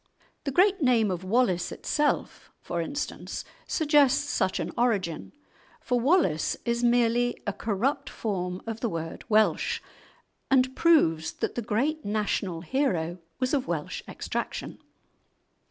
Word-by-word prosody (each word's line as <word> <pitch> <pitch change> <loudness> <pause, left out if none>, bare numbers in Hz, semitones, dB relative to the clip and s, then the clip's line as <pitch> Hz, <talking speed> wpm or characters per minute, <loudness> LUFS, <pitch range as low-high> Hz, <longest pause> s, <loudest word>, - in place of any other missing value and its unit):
The 280 - -1
great 375 +5 +4
name 235 -6 +3
of 180 0 -3
Wallace 185 -4 +1
itself, 295 0 -1
for 170 -1 -3
instance, 285 - -4 0.2
suggests 290 -2 +3
such 190 - 0
an - - -3
origin, 200 -9 0 0.5
for 245 -1 0
"Wallace" 260 - +2
is 235 0 0
merely 240 0 +2
a 205 - -1
corrupt 250 +8 -1
form 180 -4 -3
of 225 -1 -4
the 235 - -1
word 165 -3 -5
"Welsh," 215 0 +3 0.7
and 260 -1 +3
proves 165 - +3
that - - -3
the 240 - -3
great 275 +9 -1
national 205 -4 -1
hero 180 - -1 0.2
was 255 +2 0
of 275 -3 +1
Welsh 160 -4 -3
extraction. - - -4
235 Hz, 130 wpm, -27 LUFS, 185-270 Hz, 0.7 s, great